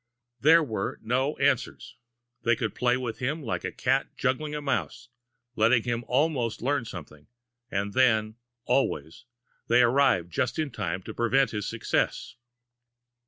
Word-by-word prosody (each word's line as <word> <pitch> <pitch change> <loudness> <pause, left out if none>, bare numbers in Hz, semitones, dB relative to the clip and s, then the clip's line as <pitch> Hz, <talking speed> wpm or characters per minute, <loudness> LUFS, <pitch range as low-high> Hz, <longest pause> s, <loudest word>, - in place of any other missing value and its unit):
There 160 +5 +6
were 110 -8 -3
no 130 +6 0
answers. - - 0 0.5
They 120 0 +3
could 110 -3 -3
play 125 0 +1
with 120 -3 -5
him, 145 +5 -2
like 115 - -3
a - - -3
cat 130 +2 -1
juggling 150 +3 -1
a - - -2
mouse, 140 -3 -3 0.5
letting 115 +1 +3
him 120 -1 -2
almost 130 -4 0
learn 140 -1 0
something 75 -7 -10 0.4
and 100 -1 -2
then, 110 -4 +3 0.3
always, 85 - -1 0.4
they 120 +1 +5
arrived 120 -9 +3
just 120 +8 -1
in 155 -3 -1
time 90 -4 -3
to - - -7
prevent 130 +3 +2
his 105 -2 -3
success! 115 -1 -1
120 Hz, 145 wpm, -27 LUFS, 110-135 Hz, 0.5 s, There